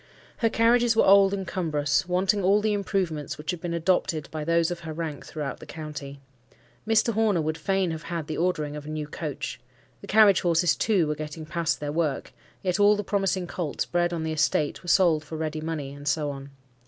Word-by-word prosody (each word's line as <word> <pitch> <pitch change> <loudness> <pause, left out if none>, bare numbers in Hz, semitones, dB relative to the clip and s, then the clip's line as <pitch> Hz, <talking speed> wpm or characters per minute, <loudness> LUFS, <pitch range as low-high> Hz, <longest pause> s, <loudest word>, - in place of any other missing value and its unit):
Her 230 - +2
carriages 230 +1 +3
were - - +4
old 195 0 +6
and 195 -1 -3
cumbrous, 150 -3 0
wanting 190 +3 +1
all 195 +3 +4
the 215 0 0
improvements 185 -8 -2
which 150 +1 -3
had 175 -2 -7
been 170 -1 -3
adopted 170 -2 0
by 155 -1 -4
those 170 +1 +2
of 175 - -4
her 160 -2 -7
rank 155 -3 -5
throughout 150 -3 -5
the - - -12
county. 145 -3 -7 0.7
Mr. 225 +1 +3
Horner 215 -4 +2
would 155 +1 -1
fain 190 +2 0
have 160 0 -5
had 165 -1 -4
the 155 - -4
ordering 155 -4 -1
of 150 0 -8
a - - -6
new 155 -1 -3
coach. 150 -1 -5 0.4
The - - -11
carriage 210 -2 +6
horses, 170 -1 +3
too, 200 -7 +2
were 150 - -1
getting 155 +1 -7
past 170 -1 -1
their 145 0 -3
work; 150 -4 -2 0.3
yet 185 +1 0
all 205 +1 +6
the 205 - -3
promising 195 -2 0
colts 175 -4 -3
bred 175 0 0
on 165 -2 -3
the 160 0 -2
estate 150 -1 0
were 175 - -7
sold 165 -4 +4
for 155 +1 -7
ready 155 0 -3
money; 155 -4 -4
and 145 0 -10
so 150 -1 0
on. 135 0 -9
165 Hz, 215 wpm, -26 LUFS, 150-190 Hz, 0.7 s, old